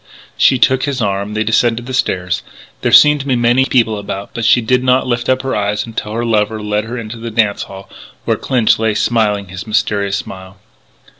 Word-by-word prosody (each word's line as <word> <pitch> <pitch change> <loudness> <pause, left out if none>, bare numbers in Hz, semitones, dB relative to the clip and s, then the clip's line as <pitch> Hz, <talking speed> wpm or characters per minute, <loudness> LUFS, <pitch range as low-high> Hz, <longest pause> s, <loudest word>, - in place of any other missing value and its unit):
She 130 - +4
took 130 +2 +2
his 140 -2 -3
arm: 100 -1 -2
they 110 - 0
descended 115 +2 +1
the 130 - -7
stairs. 90 -8 -1 0.4
There - - 0
seemed 150 0 +7
to 140 - -6
be 130 - +2
many 120 +2 +3
people 115 -5 +1
about 100 0 -6
but 115 - -3
she 120 - +5
did 125 +2 +1
not 130 0 +2
lift 120 -1 -2
her 130 +1 0
eyes 105 0 -1
until 110 -2 -5
her 120 +1 -2
lover 110 -1 0
led 105 0 -2
her 120 +2 -6
into 115 0 -7
the 115 +1 -6
dance 110 -3 0
hall 95 0 -10 0.4
where - - +1
Clinch 120 -5 +1
lay 110 -2 0
smiling 105 -3 0
his 95 +4 -8
mysterious 105 -2 0
smile. 95 +2 -9
110 Hz, 205 wpm, -15 LUFS, 105-120 Hz, 0.4 s, seemed